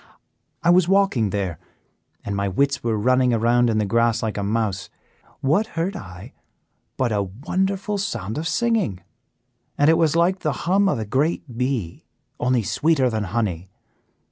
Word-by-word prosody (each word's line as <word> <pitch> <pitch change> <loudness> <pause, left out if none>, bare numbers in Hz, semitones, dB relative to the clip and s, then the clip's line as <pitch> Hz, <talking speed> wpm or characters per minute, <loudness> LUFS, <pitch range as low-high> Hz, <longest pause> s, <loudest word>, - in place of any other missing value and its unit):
"I 170 - +5
was 180 -1 +4
walking 190 - +2
there, 95 -5 -3 0.7
and 100 - -3
my 100 0 -1
wits 140 +8 0
were 115 -2 0
running 125 +2 +3
around 120 +2 +3
in 110 - +1
the 105 - +1
grass 115 +3 +1
like 110 -1 -2
a 100 - -2
mouse. 100 -2 -1 0.5
What 160 +11 +2
heard 180 +5 -1
I 90 - -10 0.6
but 130 -3 0
a 105 -1 +1
wonderful 190 - -2
sound 115 - -3
of 165 - -3
singing, 190 - 0 0.8
and 145 +2 +5
it 165 - +2
was 160 -1 +2
like 175 +3 +2
the 155 -4 -1
hum 195 +3 +3
of - - 0
a 110 - -3
great 135 +2 -1
bee, 125 -8 -2 0.4
only 125 -2 +1
sweeter 140 +2 +1
than 110 -2 -2
honey. 95 -4 -2
120 Hz, 165 wpm, -22 LUFS, 105-165 Hz, 0.8 s, I